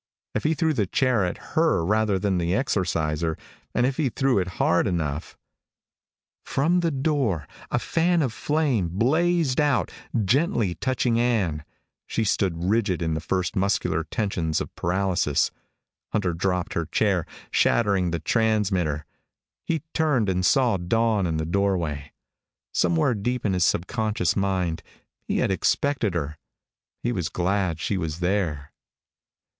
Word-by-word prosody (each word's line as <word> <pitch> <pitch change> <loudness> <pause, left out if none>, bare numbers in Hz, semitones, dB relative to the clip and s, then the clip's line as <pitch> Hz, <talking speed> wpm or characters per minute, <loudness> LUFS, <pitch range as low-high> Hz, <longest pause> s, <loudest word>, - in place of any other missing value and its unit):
If 110 - -2
he 160 +1 +2
threw 160 0 +1
the 105 -8 0
chair 125 -1 +2
at 90 - -5
her 160 - +2
rather 105 0 +2
than 95 -1 0
the 85 +2 0
Exorciser 85 - 0 0.4
and 120 - +3
if 130 +1 -1
he 150 -5 +1
threw 130 0 +1
it 90 - -1
hard 85 - +3
enough 80 -5 -3 1.1
From 165 +6 +1
the 170 -1 +1
door 135 - 0 0.2
a - - 0
fan 170 0 +1
of 125 -5 -1
flame 140 - 0
blazed 155 - +2
out, 140 - +1 0.3
gently 120 - +2
touching 125 0 0
Ann. 100 -11 +1 0.4
She 115 - -1
stood 90 -5 0
rigid 95 -3 +1
in 80 -1 0
the 80 - -1
first 90 +5 -2
muscular 95 -4 +1
tension 85 -3 -2
of - - -6
paralysis. 90 -4 +1 0.6
Hunter 95 -5 +1
dropped 90 +1 -1
the 85 -2 -2
chair, 95 -7 +1 0.2
shattering 100 -6 +2
the 85 - -1
transmitter. 95 -5 0 0.6
He 160 -4 -1
turned 140 -10 +2
and 90 0 0
saw 120 0 +3
Dawn 105 +2 +1
in 80 -1 -1
the 80 - -1
doorway. 85 -6 -1 0.6
Somewhere 85 +6 +2
deep 120 +4 -2
in 100 - +2
his 90 -2 +2
subconscious 105 0 0
mind 90 -4 0 0.5
he - - 0
had - - +1
expected 115 0 +1
her. 75 -2 -3 0.6
He 120 - +1
was 90 -8 -2
glad 90 -2 0
she 100 - -1
was 80 -1 -3
there. 85 -6 -1
100 Hz, 145 wpm, -25 LUFS, 85-120 Hz, 1.1 s, and